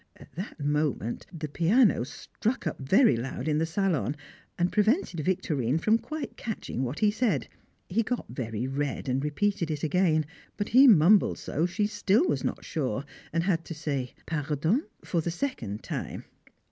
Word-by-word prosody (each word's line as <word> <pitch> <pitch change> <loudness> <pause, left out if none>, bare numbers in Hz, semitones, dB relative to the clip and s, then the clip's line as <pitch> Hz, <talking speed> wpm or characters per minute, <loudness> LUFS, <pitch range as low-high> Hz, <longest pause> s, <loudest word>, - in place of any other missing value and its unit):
At - - -16
that 185 +1 -6
moment 145 -5 -1
the 160 -4 -5
piano 180 - +3
struck 215 - -4
up 155 - -2
very 140 - +4
loud 125 +6 -4
in 150 -1 +2
the 165 - +1
salon, 160 - 0 0.4
and 175 +1 +1
prevented 215 - +2
Victorine 150 -6 0
from 220 +7 +3
quite 310 -1 -6
catching 220 - -4
what 130 +4 -3
he 210 -1 +3
said; 210 - 0 0.4
he 215 +6 +1
got 245 +2 -2
very 115 -1 -4
red 140 +1 -2
and 130 +1 0
repeated 170 +3 0
it 150 -2 -3
again, 155 -1 +2 0.3
but 205 0 -2
he 265 +4 +8
mumbled 195 -1 +6
so 165 +4 -1
she 205 +4 0
still 205 - +2
was - - 0
not - - -3
sure, 135 -4 -2 0.3
and 165 +1 +1
had 170 -3 +1
to 165 - -6
say 140 -5 -3
"Pardon?" 160 - 0 0.2
for 170 - 0
the 170 - -2
second 165 - -3
time. - - -5
165 Hz, 170 wpm, -28 LUFS, 145-205 Hz, 0.4 s, he